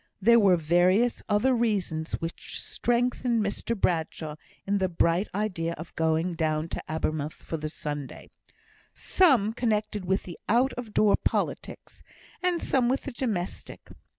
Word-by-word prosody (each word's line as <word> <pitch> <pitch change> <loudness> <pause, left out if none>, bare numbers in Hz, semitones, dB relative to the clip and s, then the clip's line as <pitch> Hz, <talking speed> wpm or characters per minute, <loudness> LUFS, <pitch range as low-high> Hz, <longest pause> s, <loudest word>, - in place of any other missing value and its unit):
There 235 +4 +6
were 195 -4 +5
various 180 +8 +3
other 210 +6 +3
reasons, 200 -9 -1
which 165 +1 -5
strengthened 240 -1 0
Mr 210 +2 -3
Bradshaw 160 -3 -1 0.3
in 200 +1 +1
the 190 -1 +1
bright 170 +3 +1
idea 180 -6 -1
of 160 +1 -10
going 160 +2 +1
down 155 0 -1
to - - -4
Abermouth 155 -1 -2
for 165 - -6
the 155 0 -4
Sunday; 145 -3 -6 0.6
some 255 - +3
connected 215 -3 -1
with 190 +2 0
the 175 - -9
out 250 +4 +3
of 240 -3 -7
door 210 -1 +5
politics, - - -3 0.4
and 360 -1 +1
some 250 -3 +2
with 265 +2 +1
the 280 - -5
domestic. 220 -8 -4
195 Hz, 145 wpm, -27 LUFS, 165-235 Hz, 0.6 s, There